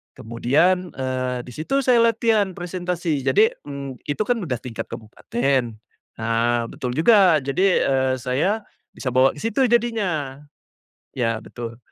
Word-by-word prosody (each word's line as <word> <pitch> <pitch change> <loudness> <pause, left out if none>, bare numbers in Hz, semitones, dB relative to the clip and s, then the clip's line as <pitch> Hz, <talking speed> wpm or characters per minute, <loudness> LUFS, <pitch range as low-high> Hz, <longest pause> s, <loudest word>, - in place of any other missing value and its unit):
kemudian, 155 +11 +1
eee, 130 -1 -2
di 125 - -10
situ 275 - 0
saya 245 -2 +4
latihan 225 -4 +2
presentasi 175 -5 -3
jadi, 210 +12 +4 0.2
mmm, 140 -3 -7
itu 145 +8 -2
kan 245 +2 0
udah 135 -10 -2
tingkat 120 -3 -6
kabupaten, 125 - -2 0.5
nah 115 +1 +1
betul 125 -1 -4
juga 185 -2 +5
jadi, 180 +8 +2
eee, 130 -1 +1
saya 180 - 0 0.3
bisa 125 - -3
bawa 130 +1 +4
ke - - -10
situ 260 +4 +2
jadinya, 200 - 0 0.8
ya 115 -3 0
betul. 115 -1 -8
145 Hz, 135 wpm, -22 LUFS, 125-195 Hz, 0.8 s, juga